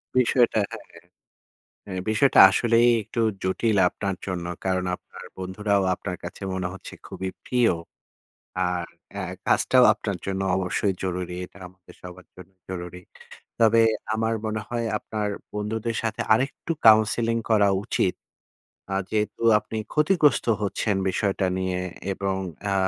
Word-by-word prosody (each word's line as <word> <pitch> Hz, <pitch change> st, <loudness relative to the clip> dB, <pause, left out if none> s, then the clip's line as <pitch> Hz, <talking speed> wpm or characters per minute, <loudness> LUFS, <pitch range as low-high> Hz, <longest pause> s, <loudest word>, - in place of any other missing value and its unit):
বিষয়টা 125 Hz, -2 st, +3 dB
হ্যাঁ, -, -, -8 dB
হ্যাঁ। -, -, -17 dB, 0.8 s
অ্যা 95 Hz, -2 st, -4 dB
বিষয়টা 110 Hz, +5 st, +4 dB
আসলেই 120 Hz, +3 st, +3 dB
একটু 115 Hz, +3 st, -3 dB, 0.2 s
জটিল 100 Hz, +3 st, +1 dB
আপনার 100 Hz, 0 st, -3 dB
জন্য। 90 Hz, -2 st, -3 dB, 0.2 s
কারণ 95 Hz, -1 st, 0 dB
আপনার 95 Hz, 0 st, -14 dB
বন্ধুরাও 100 Hz, +2 st, 0 dB
আপনার 90 Hz, 0 st, -5 dB
কাছে 85 Hz, -, -8 dB
মনে 95 Hz, -1 st, -2 dB
হচ্ছে 95 Hz, -, -10 dB
খুবই 95 Hz, -, -5 dB, 0.2 s
প্রিয়। 120 Hz, -6 st, +3 dB, 1.0 s
আর 90 Hz, -1 st, -2 dB, 0.3 s
অ্যা -, -, -4 dB, 0.2 s
কাজটাও 125 Hz, -1 st, +4 dB
আপনার 100 Hz, -3 st, -4 dB
জন্য 95 Hz, 0 st, -2 dB
অবশ্যই 95 Hz, +1 st, 0 dB
জরুরি। 90 Hz, -1 st, -3 dB
এটা -, -, -18 dB
আমাদের 90 Hz, 0 st, -18 dB
সবার 90 Hz, 0 st, -11 dB
জন্য 90 Hz, 0 st, -13 dB, 0.2 s
জরুরী। 90 Hz, -1 st, -6 dB, 0.6 s
তবে 115 Hz, 0 st, +5 dB, 0.3 s
আমার 110 Hz, +1 st, 0 dB
মনে 110 Hz, 0 st, -2 dB
হয় 120 Hz, -1 st, -2 dB
আপনার 105 Hz, 0 st, -4 dB, 0.3 s
বন্ধুদের 110 Hz, +2 st, -2 dB
সাথে 110 Hz, -1 st, -2 dB
আরেকটু 135 Hz, +7 st, -1 dB, 0.2 s
কাউন্সেলিং 110 Hz, +2 st, +4 dB
করা 105 Hz, -2 st, +4 dB, 0.2 s
উচিত। 95 Hz, -, 0 dB, 0.8 s
আ -, -, -1 dB, 0.2 s
যেহেতু 105 Hz, +1 st, -2 dB, 0.2 s
আপনি 110 Hz, -, -7 dB, 0.2 s
ক্ষতিগ্রস্ত 150 Hz, -3 st, +3 dB, 0.2 s
হচ্ছেন 100 Hz, +1 st, -1 dB
বিষয়টা 95 Hz, 0 st, 0 dB
নিয়ে 95 Hz, -1 st, -1 dB, 0.3 s
এবং 95 Hz, 0 st, -2 dB, 0.4 s
আ -, -, +1 dB
100 Hz, 135 wpm, -25 LUFS, 95-115 Hz, 1.0 s, তবে